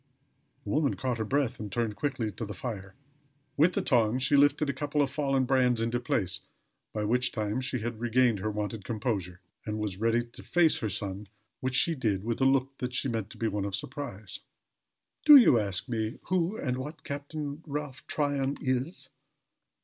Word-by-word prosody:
The - - -5
woman 150 -2 +2
caught 125 -3 -2
her - - +1
breath 130 +1 0
and 105 -2 -6
turned 115 -3 -1
quickly 115 -2 -2
to 115 - -6
the 105 -2 -5
fire. 100 -3 -6 0.6
With 165 +5 +4
the - - 0
tongs 120 -1 +2
she 145 - +3
lifted 145 +1 +4
a 140 - 0
couple 145 +2 -2
of 135 - -2
fallen 135 -2 +1
brands 125 -2 +3
into 115 +2 0
place 90 -6 -1 0.5
by 105 - -2
which 125 +4 +2
time 110 +2 -2
she 130 -2 -1
had 115 0 -4
regained 120 -2 +2
her 110 +3 -2
wonted 105 0 -3
composure, 100 -5 -3 0.2
and 105 0 -3
was 105 -3 -3
ready 115 +1 +2
to 120 - -12
face 175 -2 +3
her 110 - -2
son, 100 0 -3 0.3
which 130 0 -2
she 165 +7 +4
did, 110 -9 -1
with 115 +3 -2
a - - +5
look 135 0 +2
that 125 -1 -3
she 135 - 0
meant 110 -3 -2
to - - -12
be 115 - 0
one 105 -2 -1
of 100 -1 -2
surprise. 110 -4 -6 0.8
"Do 300 - +10
you 230 - +8
ask 100 0 -1
me 110 -2 -2
who 185 +3 +1
and 125 -1 -2
what 150 +2 -7
Captain 145 +1 -5
Ralph 145 -2 -5
Tryon 140 -2 0
is?" 130 +4 -1
125 Hz, 195 wpm, -29 LUFS, 110-140 Hz, 0.8 s, Do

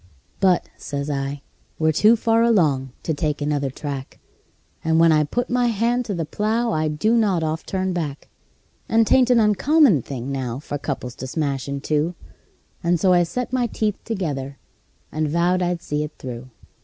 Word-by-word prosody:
"But," 185 -3 +3
says 140 0 -4
I, 140 0 -3 0.3
"we're 155 0 +2
too 210 +9 +5
far 225 0 +2
along 155 - +2
to 160 - -1
take 150 0 -1
another 145 -2 -1
track, 135 0 -6 0.7
And 160 0 +2
when 165 0 +6
I 155 -1 +4
put 240 +12 -2
my 245 0 +1
hand 235 +2 +1
to 205 - -3
the 165 -2 -2
plow 220 +8 0
I 155 -3 0
do 155 +10 +1
not 200 -7 +2
oft 155 +1 -3
turn 190 -1 -1
back; 150 -5 -4 0.6
And 225 0 +4
'tain't 255 +2 +4
an 245 -2 +5
uncommon 220 - +4
thing 130 +1 -6
now 130 -3 -3
for 145 0 -5
couples 130 -4 -4
to 130 - -6
smash 140 -2 -2
in 140 0 -3
two;" 155 +4 0 0.7
And 170 0 +2
so 185 +2 +4
I 175 - +5
set 245 +10 -3
my 250 -2 +1
teeth 210 -2 -2
together, 145 - -3 0.5
and 155 0 -1
vowed 175 +3 +2
I'd 175 -1 -1
see 150 0 -2
it 150 0 -6
through. 125 0 -7
160 Hz, 180 wpm, -22 LUFS, 145-215 Hz, 0.7 s, when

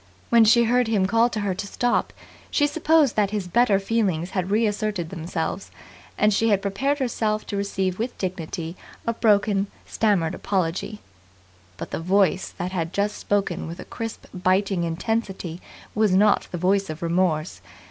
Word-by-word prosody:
When 230 -1 +7
she 235 +2 +6
heard 245 +1 +2
him 210 -4 +2
call 230 +4 +3
to 220 -3 -3
her 200 -2 0
to 200 +3 -5
stop, 245 +4 0 0.4
she 290 - +2
supposed 310 -2 +3
that 205 -2 +2
his 205 -3 -3
better 210 +2 +3
feelings 195 -5 0
had 185 -1 -2
reasserted 210 -4 0
themselves; 165 +3 -4 0.5
and 210 0 +3
she 225 +3 +2
had 200 -2 +3
prepared 265 +9 0
herself 220 -5 -1
to - - -5
receive 195 -2 -1
with 240 +3 -3
dignity 170 -2 -4 0.3
a 230 - 0
broken, 205 -3 +2 0.2
stammered 195 -7 +1
apology. 190 +2 -2 0.8
But - - -7
the - - -2
voice 190 +2 +2
that 180 +1 -3
had 170 -2 -3
just 205 +1 0
spoken 200 -5 -1
with 170 +2 -7
a - - -7
crisp, 225 -1 -6
biting 185 0 +1
intensity 185 -1 -3 0.3
was 210 -3 +2
not 205 +1 +4
the 175 - -4
voice 195 +2 +1
of 155 +2 -6
remorse. 170 -2 0
200 Hz, 165 wpm, -24 LUFS, 180-220 Hz, 0.8 s, When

